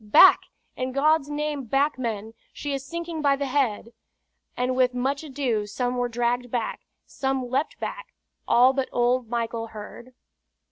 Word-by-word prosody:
"Back! 215 Hz, -, +7 dB, 0.3 s
in 255 Hz, 0 st, -3 dB
God's 295 Hz, +1 st, +3 dB
name 295 Hz, -2 st, -2 dB
back, 275 Hz, +4 st, +1 dB
men! 225 Hz, -3 st, -3 dB, 0.2 s
She 290 Hz, -1 st, -4 dB
is 270 Hz, -1 st, -3 dB
sinking 335 Hz, +2 st, -5 dB
by 280 Hz, -2 st, +4 dB
the 280 Hz, 0 st, -2 dB
head!" 250 Hz, -4 st, 0 dB, 0.6 s
And 250 Hz, +1 st, 0 dB
with 255 Hz, -1 st, +2 dB
much 270 Hz, +4 st, -1 dB
ado 255 Hz, -8 st, -1 dB
some 245 Hz, +4 st, -2 dB
were 245 Hz, 0 st, 0 dB
dragged 240 Hz, +1 st, -1 dB
back, 235 Hz, -2 st, -3 dB, 0.2 s
some 265 Hz, -2 st, -2 dB
leaped 275 Hz, +4 st, -1 dB
back -, -, -5 dB, 0.4 s
all 255 Hz, +2 st, +6 dB
but 270 Hz, -1 st, -1 dB
old 245 Hz, -1 st, +1 dB
Michael 230 Hz, -1 st, -2 dB
Heard. 225 Hz, +3 st, -10 dB
255 Hz, 155 wpm, -25 LUFS, 240-280 Hz, 0.6 s, Back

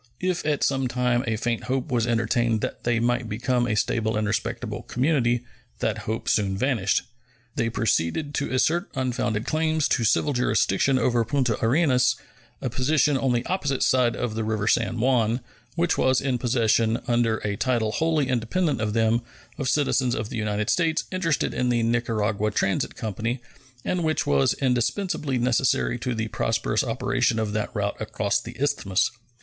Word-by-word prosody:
If 180 Hz, -1 st, -1 dB
at 150 Hz, -2 st, +1 dB
some 135 Hz, -1 st, +1 dB
time 125 Hz, 0 st, +1 dB
a 115 Hz, -, +1 dB
faint 120 Hz, +1 st, -2 dB
hope 130 Hz, +2 st, -2 dB
was 120 Hz, -2 st, +1 dB
entertained 115 Hz, -1 st, +1 dB
that -, -, -5 dB
they 120 Hz, -1 st, +2 dB
might 120 Hz, 0 st, 0 dB
become 120 Hz, +2 st, 0 dB
a 110 Hz, -, 0 dB
stable 110 Hz, +1 st, 0 dB
and 110 Hz, -, 0 dB
respectable 105 Hz, 0 st, -3 dB
community, 125 Hz, -3 st, 0 dB, 0.3 s
that 110 Hz, 0 st, -1 dB
hope 110 Hz, -, -3 dB
soon 95 Hz, -2 st, +1 dB
vanished. 110 Hz, -5 st, +1 dB, 0.5 s
They 115 Hz, -, 0 dB
proceeded 115 Hz, -, 0 dB
to 140 Hz, -, -2 dB
assert 165 Hz, +7 st, +1 dB
unfounded 125 Hz, -4 st, -1 dB
claims 155 Hz, -1 st, +1 dB
to 120 Hz, -, +1 dB
civil 135 Hz, +5 st, +2 dB
jurisdiction 125 Hz, 0 st, +2 dB
over 120 Hz, -2 st, +2 dB
Punta 120 Hz, -2 st, 0 dB
Arenas, 125 Hz, -1 st, +3 dB, 0.5 s
a 130 Hz, -, 0 dB
position 140 Hz, +4 st, +2 dB
on 135 Hz, -1 st, +1 dB
the 120 Hz, 0 st, 0 dB
opposite 145 Hz, -8 st, -1 dB
side 125 Hz, -2 st, +3 dB
of 120 Hz, -3 st, -2 dB
the 110 Hz, 0 st, -2 dB
river 110 Hz, -1 st, -1 dB
San 115 Hz, +2 st, +1 dB
Juan, 120 Hz, -1 st, +2 dB, 0.4 s
which 175 Hz, +1 st, +1 dB
was 130 Hz, -1 st, +3 dB
in 130 Hz, -3 st, -1 dB
possession, 115 Hz, -2 st, +2 dB
under 120 Hz, -2 st, +2 dB
a 100 Hz, -1 st, -1 dB
title 115 Hz, -1 st, 0 dB
wholly 155 Hz, 0 st, +1 dB
independent 130 Hz, -, 0 dB
of 105 Hz, -1 st, -1 dB
them, 115 Hz, +1 st, +2 dB, 0.4 s
of 135 Hz, -2 st, -1 dB
citizens 130 Hz, -4 st, +1 dB
of 110 Hz, -1 st, -4 dB
the -, -, -6 dB
United 105 Hz, -1 st, -1 dB
States 165 Hz, -2 st, +1 dB
interested 170 Hz, -5 st, 0 dB
in 125 Hz, 0 st, 0 dB
the 120 Hz, -1 st, +1 dB
Nicaragua 110 Hz, -3 st, 0 dB
Transit 100 Hz, -2 st, -1 dB
Company, 115 Hz, +3 st, -3 dB, 0.5 s
and 180 Hz, -2 st, 0 dB
which 155 Hz, -1 st, 0 dB
was 70 Hz, -1 st, +2 dB
indispensably 135 Hz, -, 0 dB
necessary 120 Hz, 0 st, +1 dB
to 125 Hz, 0 st, -2 dB
the 110 Hz, 0 st, -2 dB
prosperous 115 Hz, +1 st, 0 dB
operation 125 Hz, -1 st, 0 dB
of 110 Hz, -2 st, -1 dB
that 105 Hz, 0 st, -1 dB
route 100 Hz, -1 st, -1 dB
across 110 Hz, +1 st, -1 dB
the 120 Hz, +1 st, -10 dB
Isthmus. 115 Hz, -7 st, +1 dB
120 Hz, 170 wpm, -25 LUFS, 110-135 Hz, 0.5 s, Arenas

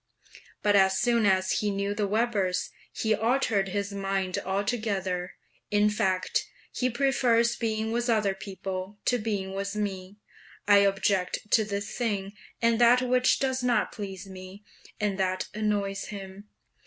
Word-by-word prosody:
But 205 Hz, -1 st, +4 dB
as 190 Hz, -1 st, +4 dB
soon 235 Hz, -3 st, +3 dB
as 190 Hz, -1 st, +2 dB
he 210 Hz, -, 0 dB
knew 200 Hz, 0 st, -1 dB
the 205 Hz, -1 st, -1 dB
Webers, 205 Hz, -4 st, 0 dB, 0.2 s
he 220 Hz, -1 st, 0 dB
altered 225 Hz, -2 st, +1 dB
his 200 Hz, +1 st, -2 dB
mind 195 Hz, -2 st, -1 dB
altogether. 195 Hz, -2 st, -2 dB, 0.3 s
In 210 Hz, 0 st, +3 dB
fact, 190 Hz, -3 st, 0 dB, 0.3 s
he 255 Hz, -, 0 dB
prefers 235 Hz, -2 st, +2 dB
being 220 Hz, -1 st, -2 dB
with 240 Hz, +1 st, -1 dB
other 215 Hz, -4 st, +2 dB
people 195 Hz, 0 st, -6 dB
to 245 Hz, -, +2 dB
being 200 Hz, -3 st, -3 dB
with 200 Hz, +1 st, -3 dB
me; 195 Hz, -2 st, -4 dB, 0.5 s
I 205 Hz, -1 st, +7 dB
object 195 Hz, 0 st, +1 dB
to 220 Hz, -, +5 dB
this 200 Hz, 0 st, -4 dB
thing 205 Hz, -5 st, -2 dB, 0.3 s
and 230 Hz, 0 st, +3 dB
that 245 Hz, +2 st, +6 dB
which 250 Hz, 0 st, +3 dB
does 260 Hz, -1 st, -1 dB
not 250 Hz, -1 st, +1 dB
please 195 Hz, -2 st, -7 dB
me, 190 Hz, +1 st, -11 dB, 0.4 s
and 205 Hz, -2 st, -1 dB
that 185 Hz, 0 st, -1 dB
annoys 205 Hz, -2 st, -1 dB
him. 200 Hz, 0 st, -9 dB
205 Hz, 145 wpm, -27 LUFS, 195-225 Hz, 0.5 s, I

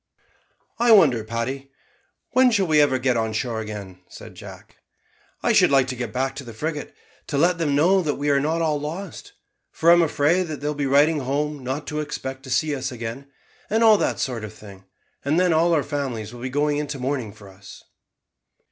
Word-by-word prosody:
"I 240 Hz, 0 st, +4 dB
wonder, 135 Hz, -, +5 dB
Paddy, 115 Hz, +5 st, -4 dB, 0.6 s
when 260 Hz, 0 st, +5 dB
we 245 Hz, -, +2 dB
shall 190 Hz, -7 st, +1 dB
ever 145 Hz, -3 st, +4 dB
get 130 Hz, -1 st, +1 dB
on 110 Hz, -1 st, -1 dB
shore 115 Hz, +1 st, -2 dB
again," 100 Hz, -4 st, -8 dB
said -, -, -12 dB
Jack. -, -, -13 dB, 0.7 s
"I -, -, +3 dB
should -, -, +5 dB
like 135 Hz, -2 st, +4 dB
to 130 Hz, -, -3 dB
get 120 Hz, -3 st, -5 dB
back 135 Hz, +3 st, -2 dB
to 140 Hz, -, -6 dB
the 115 Hz, -3 st, -11 dB
frigate, 150 Hz, +3 st, -5 dB, 0.3 s
to 145 Hz, -, -2 dB
let 170 Hz, +3 st, +2 dB
them 145 Hz, -4 st, 0 dB
know 185 Hz, +6 st, +4 dB
that 150 Hz, -4 st, -1 dB
we 145 Hz, +1 st, 0 dB
are 140 Hz, -, +3 dB
not 160 Hz, +4 st, 0 dB
all 150 Hz, -2 st, 0 dB
lost; 160 Hz, +4 st, -7 dB, 0.4 s
for 165 Hz, +1 st, +3 dB
I'm 175 Hz, 0 st, +6 dB
afraid 165 Hz, +3 st, +1 dB
that 155 Hz, -2 st, -6 dB
they 145 Hz, -, -8 dB
will 150 Hz, -, 0 dB
be 145 Hz, -1 st, -2 dB
writing 145 Hz, +3 st, +4 dB
home 145 Hz, +1 st, -2 dB
not 135 Hz, +4 st, -4 dB
to 150 Hz, -, -4 dB
expect 135 Hz, -3 st, -5 dB
to -, -, -9 dB
see 150 Hz, +4 st, +1 dB
us 130 Hz, 0 st, -4 dB
again, 120 Hz, +3 st, -6 dB, 0.4 s
and 225 Hz, +2 st, +2 dB
all 215 Hz, -2 st, +6 dB
that -, -, 0 dB
sort 120 Hz, -4 st, -3 dB
of 110 Hz, 0 st, -8 dB
thing; 100 Hz, -3 st, -14 dB, 0.4 s
and 150 Hz, +5 st, +1 dB
then 180 Hz, -2 st, +3 dB
all 165 Hz, +2 st, +3 dB
our 155 Hz, -4 st, +2 dB
families 125 Hz, -7 st, -4 dB
will 120 Hz, -, -10 dB
be 130 Hz, -, -3 dB
going 145 Hz, +2 st, 0 dB
into 150 Hz, -1 st, -3 dB
mourning 130 Hz, -4 st, -3 dB
for 105 Hz, -1 st, -15 dB
us." 95 Hz, 0 st, -14 dB
140 Hz, 210 wpm, -23 LUFS, 125-155 Hz, 0.7 s, I'm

